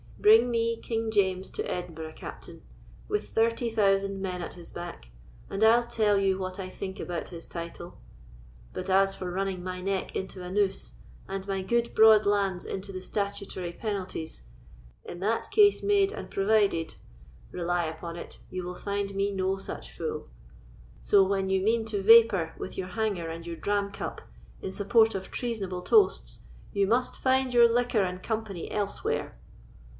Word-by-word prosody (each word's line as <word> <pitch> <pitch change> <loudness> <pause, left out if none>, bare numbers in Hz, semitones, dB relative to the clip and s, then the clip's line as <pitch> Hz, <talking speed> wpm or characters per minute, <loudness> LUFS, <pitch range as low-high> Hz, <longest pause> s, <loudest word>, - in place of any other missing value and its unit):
Bring 420 - +6
me 230 0 +1
King 225 -1 -2
James 190 -3 +1
to - - -3
Edinburgh, 160 -3 -5
Captain, - - -10 0.4
with 420 - -2
thirty 230 +1 +1
thousand 195 -3 +2
men 180 -2 -3
at - - -6
his 175 -1 -7
back, 175 - -8 0.4
and 195 +2 -1
I'll 235 +2 +6
tell 215 -3 +2
you 195 -1 +2
what 185 0 -5
I 185 -1 -4
think 190 0 -6
about 175 -1 -4
his 170 -2 -6
title; 170 0 -7 0.7
but 185 +1 -5
as 195 +1 +4
for 180 -1 -5
running 190 -1 -2
my 185 0 -4
neck 190 +1 -2
into 190 -1 -5
a 180 - -6
noose, 190 - 0 0.3
and 195 0 -5
my 195 -1 -1
good 235 +4 0
broad 220 -1 +7
lands 195 -3 +1
into 195 +1 -5
the 185 -1 -6
statutory 195 -3 -3
penalties, 185 - -4 0.6
'in 175 - -7
that 215 +5 -1
case 410 0 +5
made 400 -1 +3
and - - -7
provided,' 195 -5 +2 0.6
rely 175 -1 0
upon 160 +1 -6
it, 170 - -8
you 185 0 -4
will 180 0 -5
find 200 0 -3
me 200 +1 +1
no 190 0 0
such 195 - -7
fool. - - -4 0.7
So, 200 -1 +5
when 195 0 0
you 190 0 +2
mean 225 +2 +2
to 210 -3 -2
vapour 215 -6 +6
with - - -7
your 185 - -3
hanger 190 -4 -2
and 165 +1 -7
your 170 -1 -5
dram 200 +3 -1
cup - - -5 0.4
in 190 - -4
support 220 +3 +3
of 190 0 -5
treasonable 200 -7 -3
toasts, 425 -3 +3 0.3
you 200 -2 +2
must 245 +4 +1
find 260 -1 +2
your 240 -1 +8
liquor 240 -2 +2
and 180 0 -3
company 215 -6 -4
elsewhere." 205 -1 -2
195 Hz, 170 wpm, -28 LUFS, 185-220 Hz, 0.7 s, your